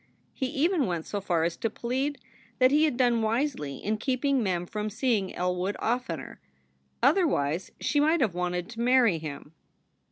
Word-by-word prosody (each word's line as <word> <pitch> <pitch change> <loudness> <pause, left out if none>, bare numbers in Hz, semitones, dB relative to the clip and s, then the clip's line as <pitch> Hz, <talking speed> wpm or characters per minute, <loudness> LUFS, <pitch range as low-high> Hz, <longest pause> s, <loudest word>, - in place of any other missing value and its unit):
He 265 - -2
even 300 +2 +1
went 170 -3 -2
so 205 - -4
far 175 -4 +1
as 165 0 0
to 225 - -1
plead 265 +6 -2 0.4
that 255 0 +5
he 300 +2 +5
had 295 -6 -1
done 240 -3 +3
wisely 220 - -1
in 215 +1 -2
keeping 265 +3 0
Mem 180 -4 -1
from 210 +3 -3
seeing 215 -3 0
Elwood 180 +2 -1
oftener; 245 +3 -3 0.6
otherwise 180 - +2
she 290 - +1
might 315 +3 +3
have 225 - +1
wanted 180 0 -2
to 230 0 -6
marry 240 -8 +4
him. 150 0 -8
225 Hz, 165 wpm, -28 LUFS, 180-265 Hz, 0.6 s, that